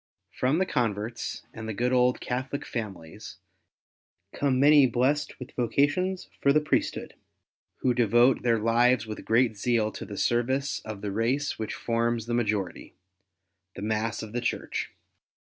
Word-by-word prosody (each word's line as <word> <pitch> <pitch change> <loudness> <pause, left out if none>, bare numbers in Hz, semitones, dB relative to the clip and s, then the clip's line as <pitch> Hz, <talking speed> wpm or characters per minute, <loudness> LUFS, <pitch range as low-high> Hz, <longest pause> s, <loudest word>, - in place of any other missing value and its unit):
From 130 +5 +1
the 190 - +2
converts 115 - -2
and 110 -1 -7
the 110 - -4
good 125 +4 0
old 125 0 +3
Catholic 130 +3 -3
fxmilies 95 -9 -7 1.0
come 135 -3 +1
many 145 -1 +7
blest 135 +5 0
with 125 - -8
vocations 145 +10 0
for 140 - +4
the 150 - +5
Priesthood, 150 - -1 0.7
who 125 - +2
devote 120 +2 +4
their 115 -2 +2
lives 115 +2 +3
with 110 -1 -7
great 115 0 +2
zeal 110 +1 +1
to - - -7
the 100 - -8
service 130 +6 0
of 110 -2 -7
the 100 - -2
race 120 +8 -1
which 110 - -3
forms 115 -1 -1
the 120 - -3
majority 105 -5 -2 0.4
— 95 +1 -55
the 100 - -7
mass 110 +1 -1
of 110 0 -9
the 120 - -1
Church. - - -2
120 Hz, 155 wpm, -27 LUFS, 110-130 Hz, 1.0 s, many